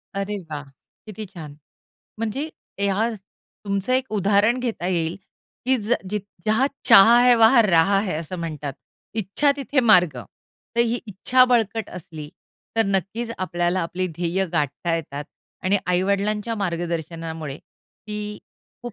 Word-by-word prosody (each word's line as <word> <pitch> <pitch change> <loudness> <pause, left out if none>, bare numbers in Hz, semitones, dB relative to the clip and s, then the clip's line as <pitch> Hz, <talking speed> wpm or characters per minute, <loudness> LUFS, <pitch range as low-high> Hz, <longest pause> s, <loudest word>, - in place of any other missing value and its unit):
अरे 200 +1 -2
वाह! 145 -2 -5 0.4
किती 215 0 -7
छान. 155 -4 -9 0.6
म्हणजे 225 +8 -2 0.4
या 200 +4 +1 0.6
तुमचं 200 +3 -1
एक 260 0 +2
उदाहरण 205 +4 +3
घेता 225 -8 -3
येईल, 170 -1 0 0.5
की 260 +1 +3
ज 225 +1 0 0.2
जित 210 -1 -1 0.3
जहाँ 220 +5 +3 0.2
चाह 230 -1 +8
है, 250 -1 +7
वहाँ 230 +1 +7
राह 195 0 +4
है. 195 -4 -2
असं 170 +3 -6
म्हणतात. 150 -4 -4 0.4
"इच्छा 220 +7 +1
तिथे 280 0 0
मार्ग." 180 - +5 0.6
तर - - +4
ही 235 +1 +1
इच्छा 235 +6 +3
बळकट 225 -3 +1
असली 155 -3 -9 0.5
तर 225 - +5
नक्कीच 200 +5 -1
आपल्याला 175 0 0
आपली 180 +2 -2
ध्येय 175 +2 -1
गाठता 155 +2 0
येतात. 145 -2 -6 0.4
आणि 195 +2 +2
आई-वडिलांच्या 200 +4 0
मार्गदर्शनामुळे 165 -5 -4
ती 210 0 -9 0.4
खूप 240 -1 -6
200 Hz, 135 wpm, -23 LUFS, 170-225 Hz, 0.6 s, चाह